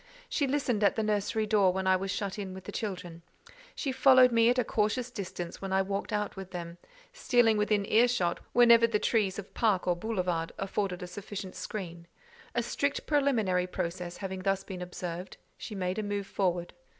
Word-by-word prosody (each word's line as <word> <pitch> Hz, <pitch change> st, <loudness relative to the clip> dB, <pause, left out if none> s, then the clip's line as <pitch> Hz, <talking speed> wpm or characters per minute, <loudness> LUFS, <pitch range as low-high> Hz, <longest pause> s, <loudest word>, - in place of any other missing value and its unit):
She 285 Hz, -, 0 dB
listened 260 Hz, -6 st, 0 dB
at 200 Hz, -, +4 dB
the 220 Hz, -, 0 dB
nursery 215 Hz, +1 st, 0 dB
door 205 Hz, -3 st, +4 dB
when 190 Hz, +1 st, -2 dB
I 190 Hz, 0 st, +5 dB
was 195 Hz, +1 st, -3 dB
shut 200 Hz, +1 st, -3 dB
in 190 Hz, -2 st, -5 dB
with 190 Hz, -, -9 dB
the 205 Hz, -, -7 dB
children; 180 Hz, -6 st, -5 dB, 0.5 s
she 275 Hz, -, -2 dB
followed 260 Hz, -1 st, +6 dB
me 230 Hz, 0 st, +5 dB
at 250 Hz, -, +2 dB
a 250 Hz, -, +3 dB
cautious 230 Hz, +3 st, 0 dB
distance 185 Hz, -5 st, -6 dB
when 195 Hz, -1 st, -4 dB
I 190 Hz, 0 st, +3 dB
walked 195 Hz, +3 st, -3 dB
out 210 Hz, -1 st, -1 dB
with 190 Hz, -1 st, -8 dB
them, 175 Hz, -1 st, -7 dB, 0.3 s
stealing 240 Hz, -, +3 dB
within 210 Hz, -1 st, +1 dB
ear 235 Hz, +3 st, +5 dB
shot 185 Hz, -9 st, 0 dB
whenever 235 Hz, -1 st, +6 dB
the 225 Hz, -2 st, +1 dB
trees 205 Hz, -3 st, +1 dB
of 200 Hz, -2 st, -8 dB
park 210 Hz, -6 st, +1 dB
or 175 Hz, -, +3 dB
boulevard 180 Hz, -4 st, -2 dB
afforded 195 Hz, -2 st, -2 dB
a -, -, -3 dB
sufficient 200 Hz, 0 st, -7 dB
screen: 175 Hz, -3 st, -6 dB, 0.5 s
a 240 Hz, -, +1 dB
strict 285 Hz, +4 st, -1 dB
preliminary 225 Hz, -12 st, +2 dB
process 175 Hz, -1 st, -4 dB
having 190 Hz, -1 st, -5 dB
thus 195 Hz, 0 st, 0 dB
been 185 Hz, -2 st, -7 dB
observed, 180 Hz, 0 st, -6 dB, 0.2 s
she 215 Hz, -, -8 dB
made 185 Hz, +1 st, -2 dB
a -, -, 0 dB
move 205 Hz, -1 st, -3 dB
forward. 180 Hz, -3 st, -1 dB
200 Hz, 195 wpm, -30 LUFS, 185-225 Hz, 0.5 s, followed